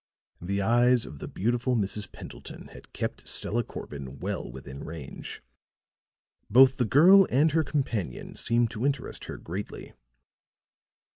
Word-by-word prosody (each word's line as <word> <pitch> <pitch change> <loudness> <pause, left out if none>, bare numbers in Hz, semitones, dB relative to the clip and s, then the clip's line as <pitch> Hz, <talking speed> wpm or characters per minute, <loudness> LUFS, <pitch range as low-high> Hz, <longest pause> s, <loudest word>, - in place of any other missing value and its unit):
The 100 +3 -1
eyes 120 +2 +4
of 75 - -10
the - - -6
beautiful 120 +4 0
Mrs. 105 -1 -2
Pendleton - - -10
had - - -14
kept - - -4
Stella 120 +2 -1
Corbin 70 - -8
well - - -4
within 65 +1 -9
range; 80 -4 -8 1.1
both 130 +4 +7
the 125 - +2
girl 180 - +7
and 150 +5 +3
her 160 +1 +2
companion 115 - -3
seemed 115 0 +1
to 115 +1 -5
interest 140 +1 -1
her - - -7
greatly. 95 +5 -7
115 Hz, 135 wpm, -27 LUFS, 90-130 Hz, 1.1 s, both